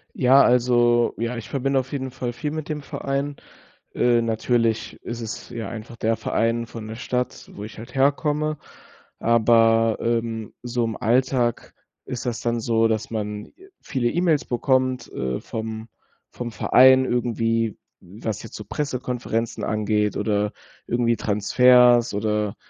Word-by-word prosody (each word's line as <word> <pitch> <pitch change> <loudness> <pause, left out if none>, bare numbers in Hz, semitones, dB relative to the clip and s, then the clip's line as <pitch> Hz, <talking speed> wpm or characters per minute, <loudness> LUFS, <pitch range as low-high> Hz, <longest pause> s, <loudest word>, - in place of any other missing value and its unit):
Ja, 130 +2 +6
also, 120 -1 +3
ja, 115 +2 -2
ich 115 - -7
verbinde 135 0 +1
auf 130 0 -5
jeden 130 -2 -3
Fall 125 -1 -4
viel 150 +4 -4
mit 155 -1 -5
dem 150 -1 -4
Verein. 140 0 -3 0.6
Äh, 120 -1 +3
natürlich 115 0 0
ist 120 0 -6
es 115 -1 -7
ja 115 -1 -5
einfach 115 +1 -8
der 115 0 0
Verein 115 +1 0
von 115 -1 -8
der 110 - -6
Stadt, 125 +1 -3
wo 105 - -7
ich 105 -1 -10
halt 115 - -10
herkomme, 150 +3 +1 0.6
aber, 115 -1 +4
ähm, 115 -2 -2
so 120 -1 -1
im 115 -1 -3
Alltag 125 0 0 0.3
ist 125 0 -5
das 120 -2 -2
dann 120 0 -1
so, 115 0 +2
dass 110 -1 -2
man 105 -2 -4 0.3
viele 130 -5 -1
E-Mails 170 -2 +1
bekommt, 130 +1 0
äh, 65 -1 -3
vom 110 0 -6 0.4
vom 120 -1 -6
Verein 130 +3 +6
irgendwie, 115 -3 0 0.2
was 105 +3 -6
jetzt 115 - -11
so 105 - -8
Pressekonferenzen 125 -5 -3
angeht 105 -1 0
oder 105 0 0 0.3
irgendwie 120 0 +1
Transfers 120 +3 +4
oder, 105 0 -1
120 Hz, 145 wpm, -23 LUFS, 110-125 Hz, 0.6 s, Ja